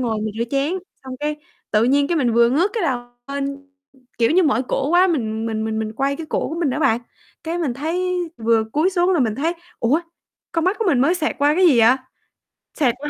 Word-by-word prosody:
ngồi 225 -4 -1
mình 215 -1 -4
rửa 235 - +1
chén, 280 +4 0 0.3
xong 260 -1 -7
cái 300 0 -2 0.3
tự 215 +2 +3
nhiên 280 +3 +3
cái 345 - +1
mình 245 -6 +1
vừa 235 0 +4
ngước 345 +10 +2
cái 450 -5 -2
đầu 260 -6 0 0.3
lên, 280 0 -4 0.5
kiểu 230 - +3
như, 365 +3 +4
mỏi 265 -5 +2
cổ 275 +1 0
quá 360 +2 +5
mình 225 -9 -1
mình 220 -1 -2
mình 220 0 -2
mình 220 0 -3
quay 275 +4 -1
cái 325 - -7
cổ - - -2
của 320 - -5
mình 295 -6 +1
đó 295 - -2
bạn, 230 -4 +2 0.4
cái 335 +2 -2
mình 280 -8 -1
thấy 360 +6 -1 0.2
vừa 225 -1 +2
cúi 320 +6 +2
xuống 360 0 +2
là 335 - +2
mình 220 -4 +1
thấy: 320 +6 0 0.3
"Ủa, 265 +8 +2 0.5
con 330 -1 0
mắt 375 +3 +1
của 450 - -1
mình 275 -8 +3
mới 305 +7 +3
xẹt 315 -4 -2
qua 290 +1 +3
cái 370 +1 +4
gì 265 -8 +5
vậy?" 240 +4 +6 0.8
Xẹt 255 -6 +2
qua 295 +2 -5
280 Hz, 245 wpm, -21 LUFS, 235-330 Hz, 0.8 s, vậy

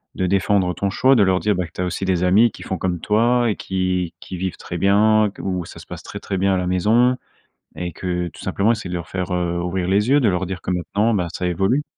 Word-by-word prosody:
de 95 - -1
défendre 95 -1 +2
ton 100 - -1
choix, 130 +7 +3
de 115 - +4
leur 95 -2 +3
dire, 105 +1 +1
ben, 90 -2 -2
que - - -21
tu - - -5
as 90 - 0
aussi 90 - -3
des 90 -2 +1
amis 105 +6 +5
qui - - -12
font 95 - -4
comme 90 -1 -1
toi 120 +5 +2
et - - -2
qui 90 -2 -2
qui 90 - -8
vivent 95 0 -3
très 90 - -6
bien 105 +3 +4
qu - - -9
où 90 -2 -2
ça - - -12
se - - -11
passe - - -8
très - - -8
très 95 - -3
bien 95 0 +2
à - - 0
la 90 - -1
maison 110 +8 +3 0.6
et 90 0 -4
que 90 -1 -2
tout - - -14
simplement 105 +3 +1
essayer 105 -5 -3
de 90 - -3
leur 85 0 -5
faire, 90 0 -3
heu, 85 -1 -1
ouvrir 90 0 -2
les 105 +5 +2
yeux, 145 - +5
de 125 - +2
leur 90 0 -1
dire 95 -1 -5
que - - -3
maintenant, 100 +5 0
bah, 90 -4 0
ça 90 - -4
évolue. 95 - +1
95 Hz, 275 wpm, -21 LUFS, 90-105 Hz, 0.6 s, amis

